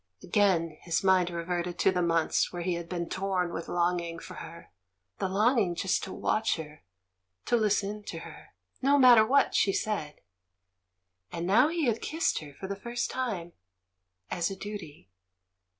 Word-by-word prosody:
Again 170 -5 +1
his 170 +1 -1
mind 185 -2 +4
reverted 175 0 -3
to - - +3
the 180 -1 0
months 165 -2 +1
when 175 -1 -5
he 180 0 0
had 170 0 -5
been 170 -2 -3
torn 185 -2 -1
with 165 - -5
longing 175 -1 0
for - - -10
her 165 0 -10 0.2
— 90 0 -53
the 190 - -1
longing 205 -2 +2
just 190 +2 0
to 190 - -8
watch 220 +1 0
her, 155 -2 -9 0.6
to - - +2
listen 210 -1 0
to - - -6
her, - - -13 0.3
no 280 +2 +4
matter 245 -5 +8
what 270 +6 +3
she 195 - +3
said. 190 -8 -3 1.1
And 170 0 -4
now 205 +10 +5
he 330 -1 -1
had 230 -3 0
kissed 320 +2 0
her 145 -3 -11
for 190 - -8
the 200 +1 -3
first 235 +4 -3
time 200 -10 -3 0.4
— 90 0 -38
as 175 0 0
a 195 - -5
duty. 185 - -9
180 Hz, 175 wpm, -29 LUFS, 170-210 Hz, 1.1 s, matter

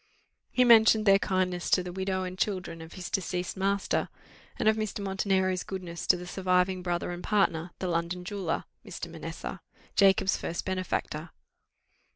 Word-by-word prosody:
He 250 - +3
mentioned 220 -2 +6
their 195 -1 +6
kindness 185 -3 0
to 180 - +4
the 180 - -6
widow 190 0 -1
and 185 0 -5
children 185 -4 -2
of 160 0 -10
his 185 -2 -6
deceased 180 -2 -2
master, 195 +1 0 0.5
and - - 0
of 220 - +5
Mr. 215 -1 -3
Montenero's 190 -2 0
goodness 180 -3 -6
to 180 - +5
the 180 - -8
surviving 185 0 +1
brother 175 -1 -2
and 175 0 -6
partner, 180 -5 +1
the 185 - -3
London 175 +1 -2
jeweller, 190 -4 -2 0.2
Mr. - - -7
Manessa, - - -6 0.3
Jacob's 195 -1 +4
first 170 - -4
benefactor. 185 -3 -2
185 Hz, 160 wpm, -29 LUFS, 180-195 Hz, 0.5 s, mentioned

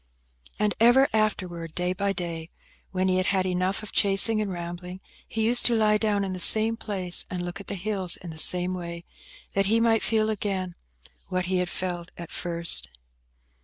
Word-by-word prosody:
And 210 -1 +1
ever 245 +4 +5
afterwards, 180 -7 -1
day 180 0 -1
by 200 +1 -1
day, 170 -3 -5 0.4
when 185 0 -1
he 185 0 +2
had 185 - 0
had 190 -1 +1
enough 185 +3 -1
of 210 - -7
chasing 205 +2 +3
and 210 - -3
rambling, 175 +1 -7 0.3
he 225 - -2
used 240 +2 +3
to 240 - +2
lie 210 -1 +3
down 210 -2 0
in 190 -1 -3
the 185 - -5
same 220 +5 +6
place, 190 -5 0
and 180 -1 -4
look 175 +2 -6
at - - -14
the - - -4
hills 190 -2 -1
in 175 -3 -9
the 160 - -10
same 180 +2 +4
way, 170 -1 -7 0.5
that 195 0 +1
he 225 +2 +2
might 230 -1 +2
feel 220 -1 +1
again 190 -4 -3 0.6
what 185 -1 -1
he 185 +1 0
had 180 -1 -1
felt 175 -2 -4
at 170 -2 -9
first. 170 -1 0
185 Hz, 195 wpm, -25 LUFS, 180-215 Hz, 0.6 s, same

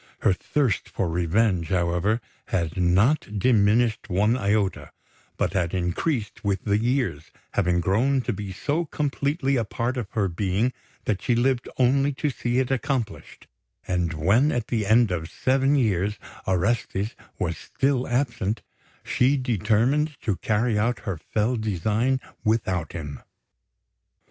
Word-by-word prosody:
Her - - +4
thirst 125 +3 -1
for 95 - -1
revenge, 90 +2 +1
however, 90 +5 +1 0.3
had 85 -4 -1
not 100 - +2
diminished 110 +1 +3
one 105 +6 +2
iota, 105 -4 0 0.5
but - - 0
had 90 -2 0
increased 100 - -2
with 100 -2 0
the 105 -1 +2
years, 120 - -1 0.2
having 90 -3 +1
grown 120 +10 +2
to 120 - -2
be 100 0 -6
so 150 - -1
completely 140 -1 0
a 115 - +1
part 120 +4 -2
of 120 -5 -3
her 105 -4 +1
being 100 +7 0 0.3
that 100 -3 0
she 120 - +1
lived 125 +1 +1
only 135 +3 +3
to 145 +2 -1
see 120 -1 -2
it 130 0 +1
accomplished; 130 -5 -3 0.4
and 90 -3 0
when, 100 - +3
at 120 -2 -2
the 110 -4 0
end 110 -1 +4
of 80 -2 -3
seven 135 +2 +2
years, 105 -5 +1 0.3
Orestes 95 +2 0 0.2
was - - -1
still 135 -2 -1
absent, 120 -5 -1 0.4
she 135 +3 +2
determined 130 - +1
to 105 -5 0
carry 110 0 +1
out 115 -1 0
her 95 -5 -3
fell 110 +8 0
design 110 +5 0 0.2
without 95 -8 0
him. 75 -5 -6
110 Hz, 140 wpm, -25 LUFS, 95-125 Hz, 0.5 s, Her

